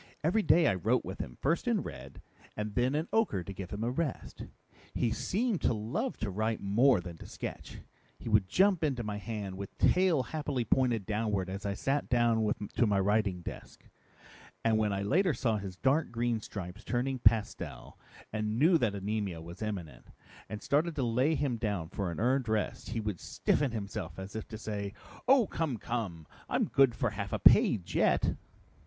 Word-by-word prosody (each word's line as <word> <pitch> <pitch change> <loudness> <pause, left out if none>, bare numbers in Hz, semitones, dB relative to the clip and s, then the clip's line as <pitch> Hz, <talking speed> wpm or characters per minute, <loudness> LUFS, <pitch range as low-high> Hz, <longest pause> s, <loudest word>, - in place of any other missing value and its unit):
Every 180 +8 +3
day 175 -4 +5
I - - +4
wrote 95 - +1
with - - -6
him, - - -6
first 165 - +1
in 230 -5 +2
red, - - -9 0.3
and 105 0 -3
then 125 +5 +1
in 155 +3 -1
ochre 205 - +2
to 100 - -7
give 95 -1 -7
him 105 +3 -4
a 120 - 0
rest. 145 +2 -3 0.5
He 115 - +1
seemed 195 - 0
to - - +2
love 110 - -2
to 105 - -1
write 110 +3 -1
more 115 +4 +4
than 85 -2 -8
to - - -10
sketch. - - -7 0.4
He - - -10
would 105 -4 +3
jump 190 -3 +3
into 135 -6 0
my 105 -1 -3
hand 105 -3 -5
with 100 - -7
tail 180 -7 +3
happily 145 -1 -2
pointed 120 -4 +2
downward 105 -3 -1
as 100 +2 -4
I 100 - -1
sat 140 +5 -1
down 120 -2 +3 0.3
to 120 - +3
my 100 -1 +2
writing 100 -2 +1
desk. - - -9 0.8
And 110 -1 +3
when 105 -1 +1
I 100 0 -1
later 175 - +2
saw 115 -4 +1
his 95 -3 -6
dark 140 +8 +2
green 120 -1 -1
stripes 95 -1 -7
turning 130 +1 -1
pastel 115 -3 0 0.3
and 110 0 -1
knew 165 +5 +5
that 110 -6 +1
anemia 100 -3 -2
was 85 +4 -10
imminent, 90 - -5 0.4
and 105 +1 -6
started 150 +4 +1
to 135 - -1
lay 125 +7 +2
him 135 -6 0
down 100 -8 -2
for 95 -2 -3
a 85 - -6
earned 125 +1 +1
rest, 110 -1 -1
he 115 - -2
would 105 -5 -3
stiffen 145 -2 0
himself 100 -6 -5
as 95 +2 -7
if 110 - -5
to 110 - -7
say, 100 -2 -4 0.3
'Oh, 265 -3 +6
come, 160 -9 -2
come! 100 -9 -4 0.2
I'm - - +2
good 135 -4 +4
for 115 0 0
half 100 -1 -5
a - - 0
page 90 -4 +5
yet!'" - - +2
110 Hz, 190 wpm, -31 LUFS, 100-135 Hz, 0.8 s, Oh